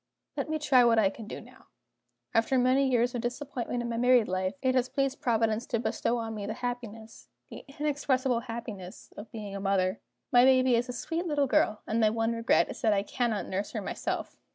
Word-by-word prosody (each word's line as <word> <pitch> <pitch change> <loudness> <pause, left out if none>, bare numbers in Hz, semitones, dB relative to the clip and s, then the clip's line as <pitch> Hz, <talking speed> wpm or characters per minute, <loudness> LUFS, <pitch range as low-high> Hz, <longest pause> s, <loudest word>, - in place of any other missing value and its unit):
"Let - - -3
me 315 - 0
try 270 -5 +4
what 235 -1 +4
I 200 -3 +4
can 220 +1 -10
do - - -6
now. - - -17 0.7
After 230 +4 +2
many 260 +2 +3
years 245 -1 +2
of 240 - -2
disappointment 245 -1 -3
in 235 - -4
my 230 - -2
married 245 -1 +4
life, 185 +1 -1
it 260 0 +3
has 255 0 +1
pleased 275 0 -1
Providence 225 -1 +1
to 230 - -1
bestow 240 +1 -1
on 225 -1 -4
me 205 -2 -5
the 215 - -3
happiness 230 -3 -6 0.2
the - - -9
inexpressible 275 -4 0
happiness 225 -6 -8
of 210 +2 -10
being 210 -3 -7
a - - -4
mother. 195 -1 0 0.3
My 245 0 +6
baby 255 -1 +5
is 240 +2 +1
a - - -1
sweet 330 +8 -3
little 295 -3 +1
girl; 215 -4 +1
and 220 - -1
my 220 -1 +4
one 225 +1 0
regret 230 0 +2
is - - -9
that 220 -2 +3
I 200 -1 +1
cannot 230 -1 -1
nurse 195 +2 -4
her - - -3
myself." - - -4
235 Hz, 215 wpm, -29 LUFS, 220-255 Hz, 0.7 s, My